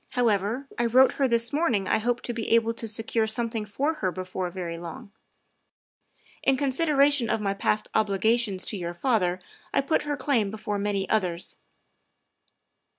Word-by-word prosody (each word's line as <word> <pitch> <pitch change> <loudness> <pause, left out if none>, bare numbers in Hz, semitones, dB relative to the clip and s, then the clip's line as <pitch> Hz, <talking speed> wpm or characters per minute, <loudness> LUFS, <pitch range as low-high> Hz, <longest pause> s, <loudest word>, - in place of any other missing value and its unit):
However, 235 +1 +1
I 240 - +2
wrote 260 +3 +6
her 275 - +1
this 235 0 +2
morning 250 - +1
I 220 - +2
hoped 240 +2 -1
to 240 - -3
be 230 -1 -4
able 230 0 +2
to 230 0 -5
secure 225 +1 -1
something 225 -1 -2
for 280 +9 0
her 185 -2 +1
before 185 0 -4
very 170 -2 -5
long. 170 +3 -9 1.3
In 270 0 +2
con 280 0 0
sideration 280 -3 +3
of 225 - +1
my 200 -2 -1
past 210 +2 0
obligations 215 -1 +1
to 210 - -1
your 175 -1 -4
father 185 -5 +1 0.3
I - - +2
put 275 +4 +1
her 290 -1 -3
claim 260 -7 +1
before 210 -1 -4
many 200 -1 -1
others." 180 -5 -1
220 Hz, 165 wpm, -26 LUFS, 195-250 Hz, 1.3 s, wrote